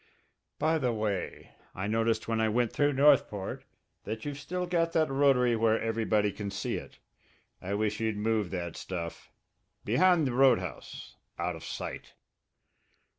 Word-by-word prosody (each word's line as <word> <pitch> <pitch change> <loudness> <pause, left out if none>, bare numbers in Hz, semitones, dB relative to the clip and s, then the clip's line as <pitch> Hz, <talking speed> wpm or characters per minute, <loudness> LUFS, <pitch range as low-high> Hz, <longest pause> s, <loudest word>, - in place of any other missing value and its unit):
"By 160 +2 +2
the 125 -4 +1
way, 105 -5 -3 0.2
I 95 - -3
noticed 110 +1 0
when 115 -1 0
I 110 - +2
went 120 +1 +1
through 145 0 +2
Northport 135 -8 +2 0.4
that 110 +4 -5
you've 145 -1 -4
still 180 +5 -3
got 170 -1 0
that 155 -3 +2
rotary 135 -3 +4
where 110 0 +2
everybody 110 -2 +1
can 100 +1 -5
see 100 - -3
it. - - -8 0.6
I 95 +2 -3
wish 105 0 -1
you'd 110 -2 -1
move 105 -2 0
that 85 -3 -4
stuff 85 -3 -6 0.5
behind 165 - +4
the 130 - -1
roundhouse, 125 -9 +1 0.2
out 85 0 -2
of 80 - -10
sight." - - -6
115 Hz, 150 wpm, -29 LUFS, 105-140 Hz, 0.6 s, rotary